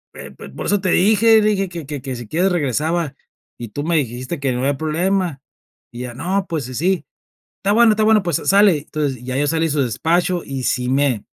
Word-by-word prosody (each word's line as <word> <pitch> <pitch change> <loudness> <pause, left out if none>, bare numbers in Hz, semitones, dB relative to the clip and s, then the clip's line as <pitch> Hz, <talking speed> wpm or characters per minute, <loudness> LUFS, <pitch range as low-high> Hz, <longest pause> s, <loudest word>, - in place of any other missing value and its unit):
eh, - - -9
pues, - - -10
por - - -7
eso 205 -1 +1
te 185 - -1
dije", 220 +4 +5
dije: 205 -3 +1
"Que 170 -3 -7
que 145 -2 -5
que 130 -1 -5
si 120 -2 -8
quieres 180 - +1
regresaba, 160 0 -1 0.4
y 120 - -7
tú 145 +7 -5
me 165 +1 +1
dijiste 130 +3 -3
que 140 -2 -1
no 125 - -3
había 140 +1 0
problema". 170 0 -1 0.5
Y 120 - -8
ya, 125 -1 -6
no, 190 +8 -1
pues, 160 -6 -2
sí 130 - -8
sí. 180 +7 0 0.5
"Está 200 +1 +1
bueno, 230 0 +6
está 215 0 0
bueno, 215 -2 +4
pues, 170 -4 0
sa - - -8
sale". 200 -3 +5
Entonces, 145 -4 -3
ya 130 +1 -3
yo 145 - +1
salí 165 +1 +1
de - - -2
su 145 -1 +1
despacho, 170 +8 0
y 135 -2 -5
sí 125 0 0
me, 135 -5 +1
160 Hz, 230 wpm, -19 LUFS, 135-190 Hz, 0.5 s, bueno